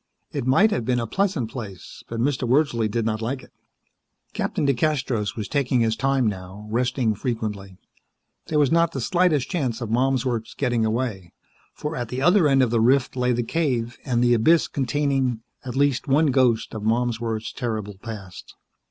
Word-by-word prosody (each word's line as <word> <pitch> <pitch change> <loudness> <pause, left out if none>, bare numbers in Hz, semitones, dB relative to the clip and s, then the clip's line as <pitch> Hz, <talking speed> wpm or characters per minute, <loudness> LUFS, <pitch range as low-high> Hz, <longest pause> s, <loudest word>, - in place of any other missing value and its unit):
It 135 -4 -3
might 195 +12 +5
have 120 - 0
been 125 +1 +1
a 115 - -2
pleasant 155 - -1
place, 100 -8 -8
but 115 - -5
Mr. 125 -1 0
Wordsley 125 -5 +2
did 115 +1 -1
not 110 0 -1
like 130 +4 -3
it. - - -18 0.8
Captain - - -1
DeCastros 135 -7 0
was 105 -3 -4
taking 130 -4 +1
his 110 -1 +2
time 135 -1 +1
now, 95 0 -4
resting 125 -1 +1
frequently. 105 -5 -4 0.7
There 155 - 0
was 145 -3 +3
not 165 0 +3
the - - -3
slightest 175 -7 +1
chance 130 - -1
of 115 -3 -5
Malmsworth's 125 -2 0
getting 120 -4 0
away, 110 -7 -3 0.4
for 150 +2 -4
at 120 -5 -3
the 125 - -3
other 175 0 +5
end 135 -2 +4
of 120 - 0
the 115 -2 +2
rift 130 +3 +3
lay 125 -1 +1
the 120 0 0
cave 120 -5 -1
and 120 -3 +1
the 120 0 +4
abyss 155 +9 +4
containing, 135 -3 0 0.2
at 125 -1 -6
least, 140 0 +1
one 145 +2 +3
ghost 125 -4 +2
of 110 - -5
Malmsworth's 115 0 -1
terrible 110 -5 -4
past. 105 -6 -9
125 Hz, 180 wpm, -23 LUFS, 115-140 Hz, 0.8 s, might